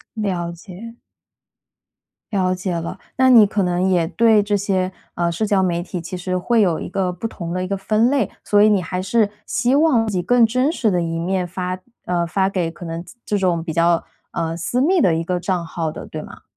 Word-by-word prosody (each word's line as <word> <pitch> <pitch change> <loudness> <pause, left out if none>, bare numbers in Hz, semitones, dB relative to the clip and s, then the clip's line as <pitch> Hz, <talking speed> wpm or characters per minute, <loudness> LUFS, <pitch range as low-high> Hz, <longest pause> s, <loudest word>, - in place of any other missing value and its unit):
了 185 -6 -2
解。 200 +6 -10 1.4
了 185 -2 +1
解 185 0 -3
了。 170 -1 -4 0.2
那 260 0 +5
你 235 -4 +8
可 200 0 -1
能 180 +1 +1
也 175 -3 +2
对 220 +3 +4
这 205 0 0
些， 190 -2 0 0.2
呃， 170 -1 0
社 215 +6 -1
交 200 -2 +2
媒 175 -2 0
体 180 0 -5
其 170 +3 -6
实 185 +1 -2
会 225 +5 +2
有 175 -6 +2
一 - - -5
个 185 0 -1
不 205 +6 -4
同 170 -6 -6
的 185 0 -1
一 - - -3
个 200 - -1
分 215 +4 +2
类， 270 -7 +1
所 205 0 +3
以 - - +6
你 205 -3 +3
还 180 +2 -3
是 205 +2 +2 0.2
希 250 +3 +1
望 280 -7 +3
以 185 -3 -1
更 240 +6 +4
真 255 +6 +1
实 240 -9 0
的 180 -3 +1
一 165 0 -2
面 185 +2 -1
发， 180 +1 -4 0.3
呃， 175 -1 0
发 190 +3 +1
给 180 -4 -1
可 175 - -12
能 165 0 -5
这 175 - -14
这 210 - 0
种 180 -3 +1
比 165 - -4
较， 170 +1 +3 0.3
呃， 165 0 -2
私 205 +9 -1
密 360 +6 +3
的 180 - +4
一 165 +1 -1
个 180 +1 -1
账 180 -1 -1
号 160 -1 -3
的， - - -9
对 - - -6
吗？ - - -12
185 Hz, 245 characters per minute, -20 LUFS, 175-215 Hz, 1.4 s, 你